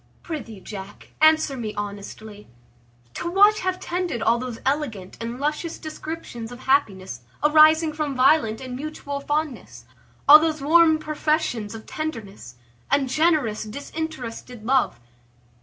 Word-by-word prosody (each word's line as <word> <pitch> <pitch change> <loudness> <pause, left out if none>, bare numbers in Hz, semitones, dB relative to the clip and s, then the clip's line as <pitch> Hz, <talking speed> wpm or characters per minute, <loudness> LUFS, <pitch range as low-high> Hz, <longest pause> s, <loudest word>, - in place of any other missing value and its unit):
Prithee, 260 - -6
Jack, 195 -1 -9
answer 315 -2 +4
me 220 -4 -5
honestly; 205 +1 -7 0.7
to 340 - -4
what 410 +4 +5
have 370 0 -2
tended 350 -10 -3
all 235 +1 +3
those 250 -2 -5
elegant 260 -10 -2
and 235 +2 -5
luscious 300 +3 -2
descriptions 310 -7 -7
of 245 +1 -10
happiness 195 - 0 0.2
arising 310 +1 +6
from 300 -2 -3
violent 255 -4 +3
and 255 -1 -6
mutual 285 0 -5
fondness? 295 -1 -3 0.4
all 300 +2 +11
those 315 -1 0
warm 320 +2 +5
professions 305 -8 -1
of 220 - -10
tenderness, 215 - -6 0.3
and 275 -2 +2
generous 300 -8 +1
disinterested 250 -2 -6
love? 260 - +1
280 Hz, 125 wpm, -23 LUFS, 225-310 Hz, 0.7 s, all